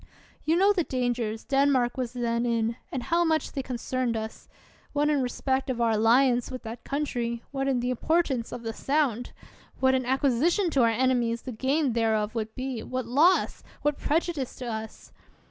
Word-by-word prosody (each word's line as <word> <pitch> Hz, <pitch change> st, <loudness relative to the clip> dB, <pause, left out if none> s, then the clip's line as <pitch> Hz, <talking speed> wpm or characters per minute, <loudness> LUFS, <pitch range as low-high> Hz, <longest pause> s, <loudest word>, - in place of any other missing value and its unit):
You 320 Hz, -, +3 dB
know 395 Hz, +3 st, +5 dB
the 360 Hz, -4 st, +1 dB
dangers 245 Hz, -5 st, -2 dB
Denmark 270 Hz, -3 st, +2 dB
was 250 Hz, -3 st, -3 dB
then 235 Hz, -1 st, -1 dB
in, 230 Hz, -1 st, 0 dB, 0.2 s
and 260 Hz, -3 st, -3 dB
how 340 Hz, +5 st, +2 dB
much 320 Hz, -2 st, +1 dB
they 275 Hz, -, -3 dB
concerned 255 Hz, -1 st, -2 dB
us; 220 Hz, 0 st, -7 dB, 0.4 s
what 295 Hz, +1 st, +2 dB
in 290 Hz, -2 st, +2 dB
re 250 Hz, -, -1 dB
spect 265 Hz, +1 st, -1 dB
of 250 Hz, -2 st, -2 dB
our 230 Hz, -1 st, +3 dB
alliance 240 Hz, +3 st, +3 dB
with 255 Hz, -1 st, -7 dB
that 225 Hz, +1 st, -7 dB
country, 240 Hz, -5 st, -2 dB
what 270 Hz, -1 st, -2 dB
in 260 Hz, -3 st, +1 dB
the 245 Hz, +1 st, -1 dB
importance 265 Hz, -2 st, 0 dB
of 235 Hz, -, -6 dB
the 225 Hz, 0 st, -3 dB
Sound; 270 Hz, -3 st, 0 dB, 0.5 s
what 260 Hz, 0 st, +4 dB
an 260 Hz, -1 st, +1 dB
acquisi 265 Hz, +3 st, +2 dB
tion 370 Hz, -2 st, +1 dB
to 270 Hz, -, +3 dB
our 230 Hz, -, +5 dB
enemies 235 Hz, -1 st, +1 dB
the 255 Hz, -, -5 dB
gain 265 Hz, +3 st, 0 dB
thereof 220 Hz, -2 st, +1 dB
would 220 Hz, -1 st, -4 dB
be, 255 Hz, -3 st, -4 dB
what 255 Hz, +1 st, -4 dB
loss, 300 Hz, +10 st, +3 dB, 0.2 s
what 295 Hz, -1 st, 0 dB
prejudice 315 Hz, -3 st, -1 dB
to 255 Hz, -, -7 dB
us 220 Hz, -1 st, -6 dB
255 Hz, 190 wpm, -27 LUFS, 235-280 Hz, 0.5 s, know